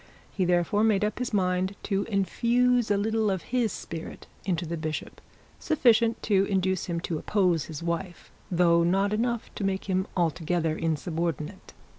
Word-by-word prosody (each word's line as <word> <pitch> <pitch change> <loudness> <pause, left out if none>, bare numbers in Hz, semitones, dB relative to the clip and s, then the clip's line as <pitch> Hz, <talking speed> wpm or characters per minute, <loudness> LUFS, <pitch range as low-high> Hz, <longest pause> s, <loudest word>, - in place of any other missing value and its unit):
He 190 - 0
therefore 175 +4 +2
made 210 -2 +3
up 210 +2 -3
his 250 - -2
mind 185 -1 0
to 200 -1 0
infuse 235 +4 +2
a 205 - +3
little 220 +1 +1
of 190 -3 -1
his 240 -3 +2
spirit 165 -1 -7 0.2
into 175 -2 -1
the 170 +1 -3
bishop, 155 -1 -5 0.4
sufficient 235 -7 +3
to 195 -3 +3
induce 190 -2 0
him 170 -2 -2
to 165 -3 -3
oppose 180 -6 +1
his 160 0 -7
wife, 175 +1 -4 0.2
though 170 -2 +4
not 195 +4 +2
enough 235 +1 -1
to - - -5
make 195 -1 -1
him 190 0 0
altogether 165 -1 0
insubordinate. 165 +1 -3
190 Hz, 160 wpm, -27 LUFS, 170-210 Hz, 0.4 s, though